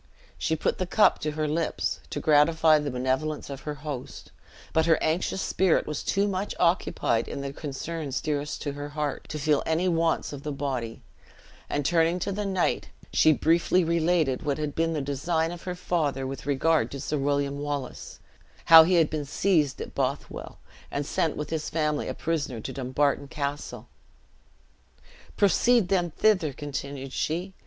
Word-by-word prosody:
She 160 - 0
put 155 - -1
the 185 - -1
cup 215 - +4
to 155 0 -2
her 155 0 -1
lips, 160 +2 -1
to - - -3
gratify 155 +1 +4
the 145 -1 -3
benevolence 130 +4 -2
of 135 -1 -7
her 150 - -3
host, 135 -4 -6 0.4
but 160 0 +3
her 165 - +5
anxious 175 +4 0
spirit 185 -3 +2
was 150 -1 -4
too 200 +1 +1
much 195 +1 -2
occupied 170 -9 +1
in 140 - -5
the 140 0 -5
concerns 150 0 -4
dearest 150 -1 -3
to 145 - -2
her 145 +1 -6
heart, 150 -2 -3
to 155 - -4
feel 150 -1 +2
any 160 +3 0
wants 165 -3 +1
of 140 - -7
the 150 +1 -4
body; 130 -5 -4 0.7
and 145 -1 -1
turning 165 +2 +3
to 190 +2 -2
the 205 +1 -2
knight, 190 -2 0 0.2
she 155 - +5
briefly 170 +4 +3
related 165 -4 +1
what 145 -2 -1
had 150 -2 -3
been 165 0 0
the 155 - -1
design 160 +4 -1
of 175 -1 -8
her 180 -1 -3
father 150 -7 -1
with 135 0 -6
regard 155 +3 +2
to 140 - -7
Sir 150 +2 -2
William 140 0 0
Wallace; 145 -3 -5 0.5
how 165 -1 +11
he 175 +3 +3
had 165 -2 +5
been 155 -1 -2
seized 150 -1 +1
at - - -6
Bothwell, - - -3 0.3
and 140 0 -3
sent 160 +2 0
with 150 0 -5
his 160 -2 -2
family 150 -2 -1
a - - -4
prisoner 150 -7 -2
to - - -6
Dumbarton 140 +2 0
Castle. 145 +1 -5 1.5
"Proceed 205 +1 +4
then 180 -3 +2
thither," 185 -4 +2
continued 140 -1 -6
she. 175 +5 -2
155 Hz, 175 wpm, -27 LUFS, 140-165 Hz, 1.5 s, how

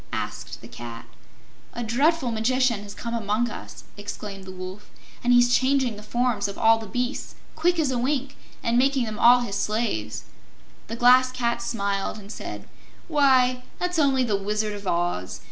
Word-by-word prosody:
asked - - -5
the - - -10
Cat. 115 -1 -9 0.7
"A 240 - -4
dreadful 265 +4 +2
Magician 235 0 +1
has 205 0 -9
come 235 0 -5
among 225 +1 0
us!" - - -9
exclaimed 205 -1 -7
the 190 - -8
Wolf, 185 +2 -8 0.3
"and 245 - +3
he's 245 0 +5
changing 260 -3 +2
the 205 - -10
forms 225 -1 0
of 200 - -7
all 225 0 +5
the 220 - -8
beasts 245 +5 -3 0.2
quick 350 +2 +2
as 300 -5 +1
a 250 - 0
wink 275 +2 -1 0.3
and 235 +1 +2
making 270 -1 +2
them 215 -1 -5
all 245 +1 +7
his 200 -5 -3
slaves." 205 - -2 0.6
The 230 - -4
Glass 255 +2 +6
Cat 235 -2 -1
smiled 200 -4 -2
and 205 0 -10
said: - - -7 0.4
"Why, 260 -5 +4 0.2
that's 360 -1 -1
only 270 -3 +3
the 220 -4 +1
Wizard 210 +2 -1
of 200 -1 -7
Oz. 170 - -1
235 Hz, 175 wpm, -25 LUFS, 205-255 Hz, 0.7 s, all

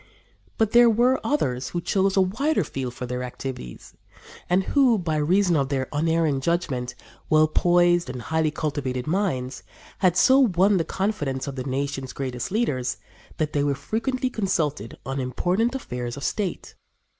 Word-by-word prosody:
But 220 -2 +2
there 240 0 +7
were 245 +4 +3
others 130 - -1
who 175 - -2
chose 195 +2 +1
a - - +6
wider 265 +12 +1
field 130 -2 -5
for 125 - -5
their 125 0 -4
activities, 125 - -7 0.6
and 180 +2 +3
who, 255 0 +3
by 165 -5 -1
reason 175 +4 +2
of 135 -3 +1
their 135 -2 -1
unerring 160 -2 +1
judgment, 135 -6 -1 0.3
well 155 0 +5
poised 175 0 +3
and 125 -2 -6
highly 160 +4 +1
cultivated 140 -4 -3
minds, 155 -8 -1 0.4
had 180 -2 +3
so 265 +1 +6
won 200 -5 +4
the 165 - 0
confidence 150 -10 -2
of 140 -2 -5
the 130 -1 -5
nation's 135 0 -3
greatest 125 -3 -4
leaders 140 - -1 0.4
that 155 -1 -1
they 145 - +1
were 145 -1 +1
frequently 255 - -2
consulted 155 - -2
on 135 +1 -3
important 180 - 0
affairs 125 - -5
of 140 - -7
state. 200 -4 -3
155 Hz, 160 wpm, -24 LUFS, 130-195 Hz, 0.6 s, there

